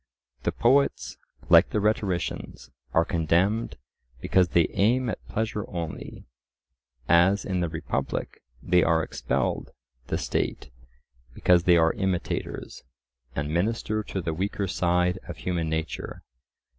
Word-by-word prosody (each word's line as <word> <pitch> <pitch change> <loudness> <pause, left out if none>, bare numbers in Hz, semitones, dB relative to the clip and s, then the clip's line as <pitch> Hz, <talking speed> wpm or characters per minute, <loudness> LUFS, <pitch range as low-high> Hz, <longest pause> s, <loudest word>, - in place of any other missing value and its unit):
The - - 0
poets, 135 +4 +2 0.3
like - - +7
the - - 0
rhetoricians, 100 -4 -2 0.2
are 80 - +3
condemned 90 +6 +1 0.4
because 90 +7 +3
they 85 -1 +3
aim 120 +4 +2
at - - -7
pleasure 110 -1 -2
only, 85 -3 -6 0.8
as 90 +5 +4
in 95 -2 -1
the 85 -1 0
Republic 80 0 -3 0.2
they 90 0 +4
are 80 -1 +3
expelled - - -1
by - - -20 0.4
the - - -1
State, 65 - -2 0.6
because 90 -1 +3
they 90 -1 +6
are 80 0 +4
imitators, 95 -3 -3 0.5
and 75 +1 -2
minister 110 +4 0
to 100 -2 -4
the 80 - -2
weaker 100 +3 -2
side 90 0 +1
of 85 - -7
human 85 -3 -2
nature. 80 0 -4
90 Hz, 130 wpm, -26 LUFS, 85-100 Hz, 0.8 s, like